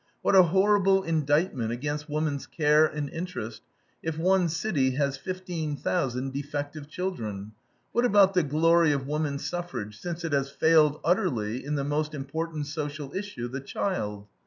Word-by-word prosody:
What - - +3
a 190 - +10
horrible 195 +2 +4
indictment 150 -6 +1
against 145 +5 -3
woman's 150 -2 -2
care 150 0 +4
and 150 -1 -4
interest, 165 -11 -5 0.4
if 160 -1 -3
one 180 +1 +3
city 155 -7 0
has 140 -1 +1
fifteen 170 -2 -4
thousand 135 -6 -1
defective 145 +1 -4
children. 110 - -4 0.4
What 240 +1 +2
about 200 -4 +5
the 180 - +4
glory 160 +1 +4
of 135 -2 -2
woman 150 0 -1
suffrage, 140 -11 -5
since 175 -1 -5
it 160 - -2
has 140 -1 +1
failed 155 0 +4
utterly 125 - 0
in 150 +2 -2
the 140 - -1
most 150 +2 -1
important 155 +2 -4
social 145 -1 -5
issue, 190 -12 -4
the 130 +2 -5
child? 105 - -3
150 Hz, 155 wpm, -27 LUFS, 140-175 Hz, 0.4 s, a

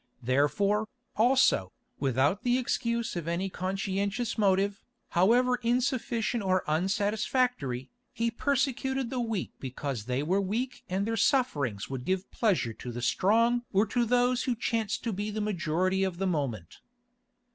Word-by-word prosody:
Therefore, 195 - +2 0.3
also, 230 - +3 0.3
without 135 - +1
the 245 0 +2
excuse 235 -3 -1
of 170 -2 -4
any 175 +3 -1
conscientious 195 +5 -2
motive, 200 -1 +1 0.3
however 245 +8 +3
insufficient 240 -2 0
or 185 -2 +1
unsatisfactory, 200 - 0 0.2
he 230 0 -1
persecuted 265 0 0
the 255 - -2
weak 225 -6 -2
because 130 -3 -4
they 125 +3 -1
were 185 +6 +1
weak 230 +7 -3
and 190 +2 0
their 225 +1 -1
sufferings 145 - +1
would 130 -2 -5
give 190 +3 -2
pleasure 185 - +1
to 125 - -7
the 120 +1 -5
strong 230 - +3
or 200 +2 +3
to 240 +3 0
those 245 +1 +2
who 250 - 0
chanced 225 -2 -1
to 230 -2 -1
be 205 +2 -3
the 215 +1 -3
majority 185 -2 0
of 190 -2 -2
the 195 - -1
moment. 135 - -2
200 Hz, 145 wpm, -29 LUFS, 170-235 Hz, 0.3 s, also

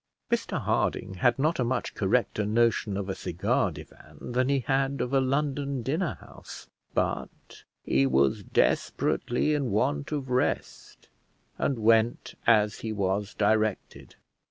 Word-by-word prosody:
Mr - - 0
Harding - - -1
had 120 -1 +4
not 155 +4 +1
a - - +3
much 125 +1 -2
correcter 105 +1 0
notion 110 -1 +1
of 100 -1 -3
a 95 - -2
cigar 90 -2 0
divan - - -11
than 130 +2 +1
he 140 -1 +2
had 135 +1 0
of 125 +3 -2
a 135 - +4
London 140 -1 -1
dinner 155 +7 -1
house, - - -12 0.3
but - - -3 0.2
he 70 +1 +2
was 65 +1 +2
desperately 125 +5 +1
in 140 -4 0
want 75 -9 0
of 135 -4 -3
rest, 125 +1 -2 0.5
and 135 - 0
went 115 +1 +2
as 105 -2 +4
he 110 - -4
was 100 0 -1
directed. 110 0 -1
120 Hz, 140 wpm, -27 LUFS, 105-135 Hz, 0.5 s, had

